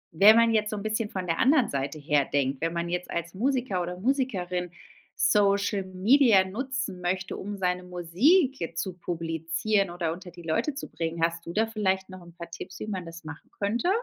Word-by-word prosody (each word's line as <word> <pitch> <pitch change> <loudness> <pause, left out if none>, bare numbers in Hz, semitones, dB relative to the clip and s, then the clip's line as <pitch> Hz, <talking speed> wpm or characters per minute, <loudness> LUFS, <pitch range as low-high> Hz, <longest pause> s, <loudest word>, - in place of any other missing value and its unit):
wenn 205 +6 +8
man 230 0 +5
jetzt 210 -1 +2
so 215 - -3
'n 200 - -5
bisschen 215 0 -1
von 185 -1 -4
der 165 -1 -1
anderen 265 -1 +4
Seite 140 +2 -3
her 145 -1 +2
denkt, 140 0 0
wenn 165 0 0
man 170 0 -2
jetzt 180 +1 -3
als 170 0 -3
Musiker 245 -3 0
oder 180 +1 -5
Musikerin 190 -8 -1 0.5
Social 200 -1 +2
Media 205 +3 +4
nutzen 245 -2 -4
möchte 185 +2 -2
um 205 +1 -5
seine 180 -1 -1
Musik 210 - +2
jetzt 165 -1 -3
zu 185 +2 -4
publizieren 170 +4 -1
oder 175 -2 -2
unter 180 +1 -10
die 175 0 -12
Leute 165 - -1
zu 280 - -6
bringen, 165 0 -3
hast 165 0 0
du 170 - -5
da 220 +3 +2
vielleicht 190 -4 -1
noch 185 -1 -10
'n 170 0 -14
paar 170 -1 -8
Tipps, 185 +3 -8
wie - - -5
man 185 -4 -4
das 165 0 -10
machen 160 0 -10
könnte? 225 - 0
185 Hz, 205 wpm, -27 LUFS, 170-215 Hz, 0.5 s, wenn